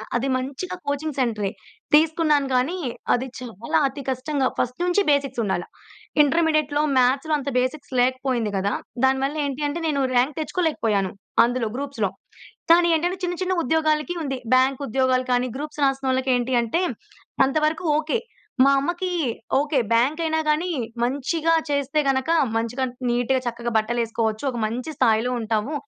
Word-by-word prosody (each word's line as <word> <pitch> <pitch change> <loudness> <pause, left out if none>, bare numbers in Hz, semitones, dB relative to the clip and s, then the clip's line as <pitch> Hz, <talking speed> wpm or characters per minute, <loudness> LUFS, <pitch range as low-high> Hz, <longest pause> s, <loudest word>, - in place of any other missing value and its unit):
అది 245 +3 0
మంచిగా 275 +8 -5
కోచింగ్ 285 +1 -2
సెంటరే. 215 -6 0 0.4
తీసుకున్నాను 305 -2 +4
కానీ, 265 +9 +1 0.4
అది 250 +2 0
చాలా 235 -3 -2
అతి 275 +1 -7
కష్టంగా 265 +1 0
ఫస్ట్ 250 +3 -2
నుంచి 360 +3 +2
బేసిక్స్ 275 -3 0
ఉండాల. 185 -4 -1 0.6
ఇంటర్మీడియేట్‌లో, 305 -1 +2 0.2
మ్యాథ్స్‌లో 265 +5 +2
అంత 280 -1 -4
బేసిక్స్ 255 +4 -3
లేకపోయింది 255 -3 0
కదా! 200 +2 0 0.3
దానివల్ల 265 +2 +1
ఏంటి 280 +1 -3
అంటే, 290 +4 -3
నేను 285 -3 0
ర్యాంక్ 255 +4 +2
తెచ్చుకోలేకపోయాను. 230 - 0 0.3
అందులో 240 -2 -1
గ్రూప్స్‌లో. 270 -7 -2 0.6
కానీ, 345 +1 +6
ఏంటంటే 350 +4 0
చిన్న, 355 0 -1
చిన్న 370 0 0
ఉద్యోగాలకి 310 +3 +1
ఉంది, 270 -3 -3 0.2
బ్యాంక్ 260 +2 +2
ఉద్యోగాలు 255 +1 +1
కానీ, 245 0 +1
గ్రూప్స్ 300 +1 -6
రాసినోళ్ళకేంటి 260 -2 0
అంటే 285 +11 0 0.6
అంత 270 +3 -1
వరకు 320 +3 -3
ఓకే. 315 +8 -1 0.5
మా 275 - +5
అమ్మకి 350 +6 -2 0.5
ఓకే, 290 -1 +1
బ్యాంక్ 260 +8 +2
అయినా 320 0 +1
గాని 315 +4 +1 0.3
మంచిగా 285 +6 0 0.2
చేస్తే 280 +1 0
గనుక, 265 +2 0 0.3
మంచిగా 230 +3 -2 0.3
నీట్‌గా 245 +2 +1
చక్కగా 235 0 -3
బట్టలెసుకోవచ్చు. 225 0 -1
ఒక 240 - -6
మంచి 245 +8 -4
స్థాయిలో 225 +2 +2
ఉంటాము. 225 +4 -1
270 Hz, 140 wpm, -23 LUFS, 245-305 Hz, 0.6 s, కానీ